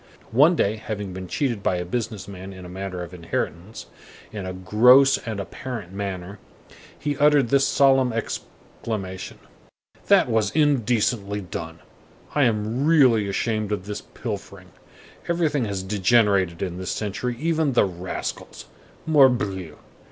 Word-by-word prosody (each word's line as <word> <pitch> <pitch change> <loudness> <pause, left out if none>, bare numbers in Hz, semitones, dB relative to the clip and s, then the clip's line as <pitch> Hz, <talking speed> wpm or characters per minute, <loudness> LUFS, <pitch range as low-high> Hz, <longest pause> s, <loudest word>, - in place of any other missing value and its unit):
One 150 +9 +5
day, 110 -7 +1
having 105 -3 -5
been 95 0 -7
cheated 120 -1 -1
by 95 - +1
a 90 0 -3
business 110 +1 -4
man 95 0 -9
in 95 -1 -10
a - - -9
matter 95 -1 -5
of 85 +1 -10
inheritance, 85 +3 -4 0.5
in 100 -3 -6
a 95 - -4
gross 125 +9 +5
and 110 -4 -5
apparent 105 -2 -6
manner, 100 -1 -5 0.6
he 145 0 -2
uttered 145 -4 +4
this 140 +1 +3
solemn 135 -2 +4
exclamation: 105 -3 -6 0.7
"That - - +5
was 110 -4 +1
indecently 120 -8 +1
done! 80 -3 -7 0.5
I 145 -2 +3
am 110 +3 0
really 130 -10 +4
ashamed 110 +1 -1
of 100 -3 -2
this 105 0 -5
pilfering. - - -8 0.6
Everything 160 -7 +1
has 100 -3 -3
degenerated 100 -3 +2
in 90 -1 -4
this 95 - -5
century, 115 +4 -3
even 160 -2 +1
the 120 - +4
rascals. 90 -1 -6 0.4
Morbleu! 120 - +2
105 Hz, 135 wpm, -23 LUFS, 95-125 Hz, 0.7 s, One